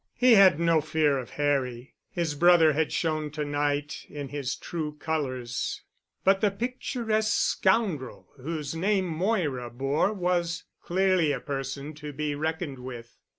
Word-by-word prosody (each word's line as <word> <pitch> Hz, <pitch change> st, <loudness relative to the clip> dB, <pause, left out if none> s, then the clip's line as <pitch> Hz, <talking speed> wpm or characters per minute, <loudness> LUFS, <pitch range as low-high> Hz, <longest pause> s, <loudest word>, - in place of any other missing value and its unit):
He 250 Hz, 0 st, +5 dB
had 190 Hz, -6 st, +7 dB
no 165 Hz, -2 st, +3 dB
fear 150 Hz, -2 st, +1 dB
of 125 Hz, -, -7 dB
Harry. 135 Hz, -4 st, -1 dB, 0.2 s
His 170 Hz, -4 st, -2 dB
brother 165 Hz, 0 st, +5 dB
had 160 Hz, +1 st, 0 dB
shown 155 Hz, -2 st, -1 dB
to 150 Hz, -1 st, -2 dB
night 145 Hz, 0 st, -1 dB
in 145 Hz, -2 st, -6 dB
his 140 Hz, -2 st, -3 dB
true 155 Hz, -4 st, -5 dB
colors, 130 Hz, -6 st, -3 dB, 0.4 s
but 195 Hz, 0 st, +4 dB
the 210 Hz, -, +4 dB
picturesque 225 Hz, 0 st, -1 dB
scoundrel 190 Hz, -, 0 dB
whose 150 Hz, +2 st, -4 dB
name 190 Hz, +3 st, +1 dB
Moira 165 Hz, -, -1 dB
bore 135 Hz, -, 0 dB
was 180 Hz, -3 st, -1 dB, 0.2 s
clearly 185 Hz, -3 st, +2 dB
a 135 Hz, -, -1 dB
person 140 Hz, +2 st, -5 dB
to 150 Hz, 0 st, -8 dB
be 150 Hz, +1 st, -2 dB
reckoned 155 Hz, -2 st, -3 dB
with. 120 Hz, -2 st, -9 dB
155 Hz, 145 wpm, -27 LUFS, 140-180 Hz, 0.4 s, had